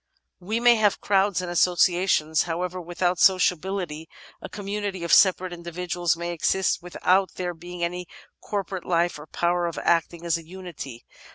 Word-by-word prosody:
We 210 +5 -2
may 240 0 +5
have 210 -2 +2
crowds 195 -2 +1
and 175 - -4
associations, 175 -3 +2
however, 180 +2 -3
without 175 +1 -1
sociability; 180 -3 +1 0.3
a - - -8
community 200 -2 -4
of 170 - 0
separate 185 -2 +4
individuals 175 0 -2
may 170 0 -4
exist 185 +3 0
with 180 0 -10
out 190 +1 +3
there 180 -1 -3
being 175 +1 -8
any 180 +1 -3 0.3
corporate 195 -3 -4
life 170 -2 0
or 150 - -11
power 175 +2 0
of 170 - -5
acting 170 0 0
as 170 -1 +1
a - - -12
unity. 160 -8 -9
175 Hz, 160 wpm, -25 LUFS, 170-190 Hz, 0.3 s, may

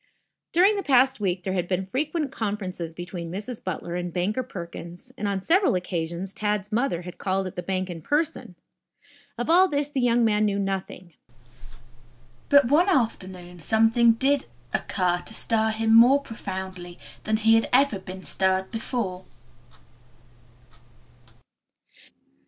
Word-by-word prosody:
During 390 +5 +4
the - - -1
past 265 -4 +3
week 185 -3 -1
there 190 - -2
had 180 -2 -1
been 190 +1 -1
frequent 295 - -2
conferences 185 -6 -4
between 175 -1 -6
Mrs. 210 +6 -6
Butler 175 -1 -4
and 175 0 -3
Banker 190 +8 -1
Perkins, 175 -6 -9
and 205 - -3
on 195 -2 -2
several 370 - +3
occasions 180 +1 -3
Tad's 210 -1 -2
mother 220 -6 0
had 180 0 -10
called 190 0 -1
at 185 - -6
the 180 - -4
hank 185 0 -1
in 170 -3 -7
person. 300 - -2 0.8
Of 240 - -3
all 360 +4 +6
this 290 -3 -1
the 280 -3 -2
young 240 -1 +3
man 215 -1 +2
knew 200 -1 0
nothing. 190 -3 -4 1.4
But 285 -1 +6
one 310 +10 +3
afternoon 185 - -1
something 225 +4 +4
did 270 +4 +1 0.3
occur 180 -2 0
to 220 - -8
stir 220 -1 +1
him 220 0 +1
more 245 +5 +7
profoundly 190 -7 -7 0.3
than 215 0 +1
he 225 +1 +4
ever 265 -4 +4
had 190 - -14
been 185 0 -8
stirred 190 0 0
before. 220 -5 -4
205 Hz, 145 wpm, -25 LUFS, 185-245 Hz, 1.4 s, more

